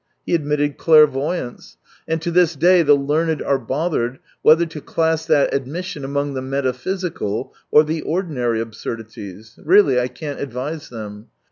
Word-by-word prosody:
He - - -2
admitted 145 -2 0
clairvoyance 150 -3 +2
— - - -30
and 160 0 0
to 170 - -1
this 170 -1 +3
day 175 +4 +5
the 145 -3 +5
learned 150 +3 0
are 140 -1 +1
bothered 130 -1 -2 0.2
whether 160 +2 +5
to 160 -2 -8
class 160 +1 -1
that 145 - +3
admission 145 +3 -4
among 140 +1 -2
the 130 - -3
metaphysical 135 - -3 0.2
or 150 - +6
the 155 +1 -3
ordinary 145 - -1
absurdities. 110 -2 -8
Really, 160 -7 +5
I 125 - 0
can't 140 +4 -7
advise 140 +4 -5
them. 105 -2 -8
145 Hz, 150 wpm, -20 LUFS, 125-160 Hz, 0.2 s, or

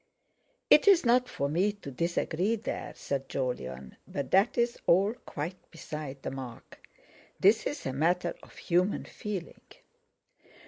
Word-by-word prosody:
"It's 385 -7 +7
not 250 +1 +4
for 140 - -1
me 180 +8 +2
to 205 -9 -9
disagree 170 - 0
there," 225 - -5
said 135 -1 -3
Jolyon; 65 - -4
"but 140 -2 -4
that's 235 +5 +3
all 195 +5 +4
quite 165 +5 -6
beside 150 -4 -7
the - - -3
mark. 130 -3 -9 0.6
This 210 +4 +4
is 290 - -5
a 130 - -2
matter 170 +6 +1
of - - -16
human 180 +3 +1
feeling." 200 -5 -6
170 Hz, 130 wpm, -30 LUFS, 135-205 Hz, 0.6 s, It's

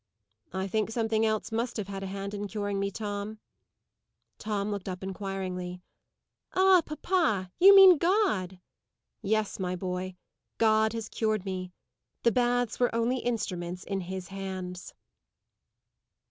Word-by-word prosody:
"I 190 0 -2
think 215 +2 0
something 225 -1 +1
else 215 +1 -1
must 230 +2 -2
have 205 -3 -3
had 195 -1 -5
a 195 - -4
hand 195 +1 -5
in 205 0 -4
curing 205 -1 -2
me, 200 0 0
Tom." 205 +1 -5 1.0
Tom 210 -1 -2
looked 200 -1 -4
up 185 0 -6
inquiringly. 185 -2 -5 0.7
"Ah, 375 -1 +6
papa! 300 - 0
You 395 +2 +9
mean 380 -5 +9
God." 335 - +1 0.6
"Yes, 215 0 0
my 180 -1 -1
boy. 185 0 -4 0.4
God 220 -1 +3
has 225 -2 -4
cured 215 -4 -1
me. 185 -1 -4 0.5
The 235 - +5
baths 245 -1 +1
were 245 - +3
only 235 +3 +1
instruments 185 -7 -3
in 195 -1 -3
His 185 0 -6
hands." 185 -2 -6
205 Hz, 135 wpm, -29 LUFS, 190-225 Hz, 1.0 s, You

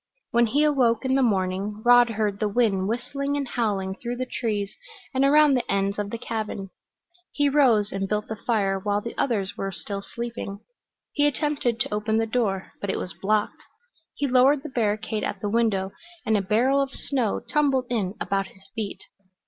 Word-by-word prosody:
When 235 0 +4
he 285 +7 +2
awoke 260 -6 +2
in 260 - +2
the 270 - +3
morning 200 -1 0
Rod 245 0 +7
heard 210 -2 -1
the 210 - +1
wind 200 -4 +1
whistling 280 +5 -2
and 280 -2 -2
howling 205 -6 -1
through 240 +4 -5
the 255 +1 -3
trees 210 -6 -2 0.4
and 265 +1 +2
around 295 +1 +6
the 250 - 0
ends 200 +1 0
of 205 -1 -2
the 230 - -4
cabin. 215 -4 -4 0.6
He 290 -1 +2
rose 245 -8 +4
and 195 0 -3
built 210 0 -1
the 220 - -4
fire 200 -4 0
while 205 +1 0
the 230 +3 -6
others 205 -7 -1
were 195 0 -3
still 200 +1 -5
sleeping. 235 -2 -6 0.5
He 290 0 +3
attempted 290 -5 0
to - - 0
open 215 +1 0
the 225 - +2
door, 215 -5 -1
but 200 - -3
it - - 0
was 180 - -5
blocked. 210 +1 0 0.5
He 285 - -1
lowered 270 +2 +4
the 305 - -6
barricade 215 -3 -1
at 200 - -3
the 205 - -2
window, 205 -4 +1 0.3
and 220 - +2
a 205 - +2
barrel 245 +8 +2
of 275 - -1
snow 250 -7 -1
tumbled 275 -4 +1
in 205 -5 -1
about 195 0 -1
his 190 0 -18
feet. 220 -3 -5
220 Hz, 190 wpm, -25 LUFS, 200-255 Hz, 0.6 s, Rod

